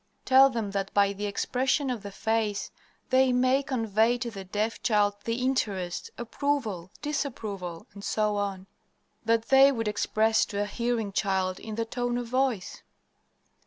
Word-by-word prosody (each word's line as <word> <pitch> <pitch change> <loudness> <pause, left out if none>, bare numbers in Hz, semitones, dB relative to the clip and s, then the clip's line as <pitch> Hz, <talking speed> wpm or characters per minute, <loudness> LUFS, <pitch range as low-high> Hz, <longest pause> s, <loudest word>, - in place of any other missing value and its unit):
"Tell 270 +1 +7
them 225 -6 -3
that 195 0 -2
by 200 -1 +4
the 205 +1 -4
expression 260 +6 0
of 240 -4 -4
the 200 - -7
face 215 0 -1 0.4
they 260 0 +5
may 255 +2 +3
convey 230 -3 +1
to 235 0 -4
the 195 -3 -7
deaf 210 +4 -2
child 210 -3 +2
the 230 - 0
interest, 195 -9 -1
approval, 235 - -2
disapproval, 210 - -4
etc., 205 -2 -1 0.6
that 225 0 +1
they 270 +1 +7
would 225 -4 -2
express 220 +1 +2
to 205 -1 -2
a - - -2
hearing 230 0 -2
child 190 -2 0
in 220 -1 -7
the 230 +1 -1
tone 245 +1 -2
of 245 - -3
voice. 250 -5 -1
225 Hz, 150 wpm, -27 LUFS, 200-250 Hz, 0.6 s, Tell